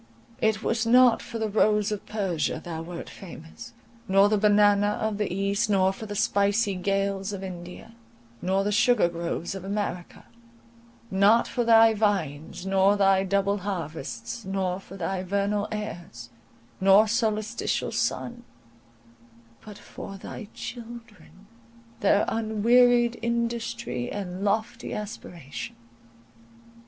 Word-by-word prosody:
It 220 0 +1
was 225 -1 0
not 245 0 +6
for 235 - -7
the 220 -1 -1
rose 210 0 +2
of 210 - -5
Persia 180 -8 -1
thou 165 -2 -5
wert 170 +1 -7
famous, 165 -4 -11 0.3
nor 195 +1 +5
the 215 - +2
banana 205 0 +4
of 215 -1 -2
the 210 - -1
east; 200 +2 0
not 190 -2 +3
for 220 +3 -8
the 205 - -5
spicy 200 +1 +2
gales 195 +1 -1
of 195 -1 -6
India, 180 +3 -9 0.5
nor 190 +2 +1
the 205 - 0
sugar 220 -1 +4
groves 170 +1 -4
of 195 -2 -7
America; 195 -3 -4 0.9
not 200 +4 +4
for 245 - -1
thy 225 -1 +6
vines 190 -7 -1
nor 195 +1 +3
thy 195 -1 +4
double 200 +1 0
harvests, 165 - -5
nor 190 -1 -2
for 195 0 -12
thy 185 +1 -2
vernal 200 +2 -1
airs, 175 - -7 0.5
nor 195 +3 +6
solstitial 220 0 -1
sun—but 115 - -7
for 195 -1 -9
thy 210 +2 -8
children, 230 -4 -10 0.5
their 205 0 +3
unwearied 235 +2 +3
industry 235 - -2
and 190 -1 -5
lofty 220 +3 -1
aspiration. 180 - -7
200 Hz, 125 wpm, -26 LUFS, 185-220 Hz, 0.9 s, not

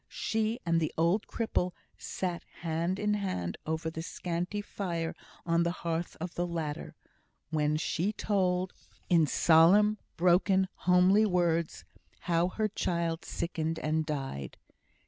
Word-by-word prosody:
She 220 +2 -1
and 165 -1 +3
the 155 - -1
old 170 +6 +2
cripple 180 -6 -1 0.2
sat 180 -2 -4 0.2
hand 170 +2 -1
in 210 0 +1
hand 185 - -2
over 160 +1 -2
the 160 - -5
scanty 180 +3 -3
fire 175 -5 -3 0.3
on 170 0 +2
the 170 - +2 0.2
hearth 170 +1 -2
of 170 +1 -5
the 175 0 -1
latter, 160 -4 -4 0.6
while 150 -1 +1
she 175 +5 0
told 185 -3 0 0.4
in 165 -3 +5
solemn, 190 +9 +5 0.2
broken, 190 +2 +4 0.2
homely 185 +4 +6
words, 170 -3 0 0.4
how 170 0 +2
her 215 +4 -1
child 170 -4 -1
sickened 160 -1 -2
and 155 +1 0
died. 135 - -4
170 Hz, 130 wpm, -30 LUFS, 160-190 Hz, 0.6 s, homely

